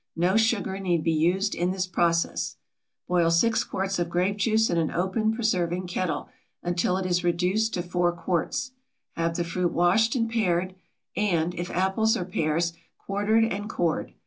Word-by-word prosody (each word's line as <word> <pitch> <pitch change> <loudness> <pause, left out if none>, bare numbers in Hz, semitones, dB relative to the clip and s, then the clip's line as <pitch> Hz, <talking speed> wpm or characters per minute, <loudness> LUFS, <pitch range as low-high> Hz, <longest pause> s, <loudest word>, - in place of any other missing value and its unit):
No 180 +4 +2
sugar 220 -4 +1
need 175 -4 0
be 165 - +2
used 180 +6 +1
in 175 +1 0
this 185 0 -1
process. 170 -2 0 0.5
Boil 175 -2 +3
6 220 +7 +3
quarts 195 0 -2
of 175 -1 -1
grape 180 +4 0
juice 220 +2 +2
in 170 - +2
an 160 - 0
open 190 +5 0
preserving 185 -6 0
kettle, 180 -1 -2 0.4
until 175 +1 0
it 190 - -3
is 180 -1 +1
reduced 180 +6 +1
to 175 - -2
4 175 0 +1
quarts. 180 - -2 0.4
Have 165 0 -1
the 175 - 0
fruit 175 +1 -1
washed 190 +7 +3
and 230 -2 +1
pared, 185 -5 0 0.4
and, 175 -4 +1
if 175 +1 -4
apples 205 +5 +1
or 180 - -3
pears, 165 -1 0 0.2
quartered 205 +3 +1
and 205 -1 -3
cored. 170 -6 -1
180 Hz, 170 wpm, -26 LUFS, 175-205 Hz, 0.5 s, Boil